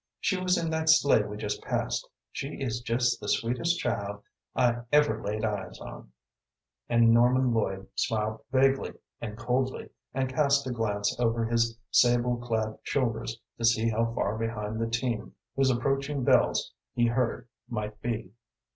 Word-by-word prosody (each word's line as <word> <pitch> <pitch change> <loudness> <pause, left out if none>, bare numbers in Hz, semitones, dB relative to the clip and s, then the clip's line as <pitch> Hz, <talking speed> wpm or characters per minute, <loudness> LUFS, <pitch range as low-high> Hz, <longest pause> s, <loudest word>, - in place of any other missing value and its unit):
She 195 - +1
was 185 0 +1
in 165 -1 -1
that 160 0 0
sleigh 145 -7 +6
we 105 0 -6
just 105 -1 -3
passed. - - -2 0.2
She 140 +2 -5
is 120 -3 -2
just 120 +1 +1
the - - -4
sweetest 125 +9 +1
child 105 - -2 0.3
I 120 -2 +3
ever 150 0 +3
laid 105 +2 -2
eyes 100 -4 -4
on," - - -10 0.8
and 115 -1 +5
Norman 125 +1 +4
Lloyd 95 -3 -1
smiled 110 -1 -1
vaguely 135 +1 +2 0.3
and 105 -2 -5
coldly, 125 +2 -1 0.2
and 135 0 -1
cast 140 +1 +2
a 130 - -2
glance 105 -3 -1
over 115 -1 +1
his 115 0 +1
sable 120 0 +4
clad 110 -2 -2
shoulders 115 -3 -1 0.2
to - - -4
see 115 0 +3
how 115 +1 0
far 110 -2 -1
behind 110 -1 -3
the 115 - 0
team 120 -1 -2 0.2
whose 135 -1 +3
approaching 135 +2 0
bells - - +3 0.2
he 120 - +3
heard 120 +1 0 0.2
might 105 -2 -4
be. 115 -5 -3
120 Hz, 155 wpm, -28 LUFS, 110-130 Hz, 0.8 s, sleigh